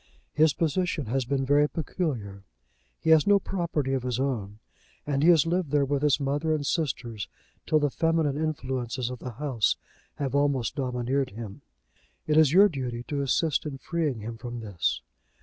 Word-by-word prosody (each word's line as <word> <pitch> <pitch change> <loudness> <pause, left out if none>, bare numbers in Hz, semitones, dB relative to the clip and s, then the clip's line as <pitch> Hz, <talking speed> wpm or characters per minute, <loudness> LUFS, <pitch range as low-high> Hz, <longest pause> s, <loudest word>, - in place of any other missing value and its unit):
His 155 -1 +4
position 165 -1 0
has 130 +3 -1
been 135 +1 0
very 145 +2 +4
peculiar. 130 - -3 0.6
He 160 - +1
has 160 +1 +6
no 205 0 +6
property 170 -8 -2
of 135 - 0
his 125 -1 -2
own, 110 -7 -2 0.5
and 140 -2 0
he 165 - +5
has 165 -4 +6
lived 175 -1 0
there 145 0 +2
with 140 0 -1
his 150 -1 +3
mother 145 +3 0
and 145 -2 -3
sisters 120 - -2 0.4
till 155 - +4
the 145 -2 +1
feminine 165 -3 +1
influences 130 -5 -2
of 125 - -7
the 125 - -6
house 125 -3 0 0.4
have 135 -3 -3
almost 140 -4 +1
domineered 130 +1 -1
him. 105 -1 -8 0.6
It 150 - +1
is 155 -3 +6
your 195 +5 +7
duty 125 -8 -4
to 145 -1 -1
assist 140 +2 +1
in 140 -2 -5
freeing 150 -5 -2
him 115 +2 -6
from 120 +1 -6
this." 100 -6 -2
140 Hz, 175 wpm, -27 LUFS, 125-155 Hz, 0.6 s, your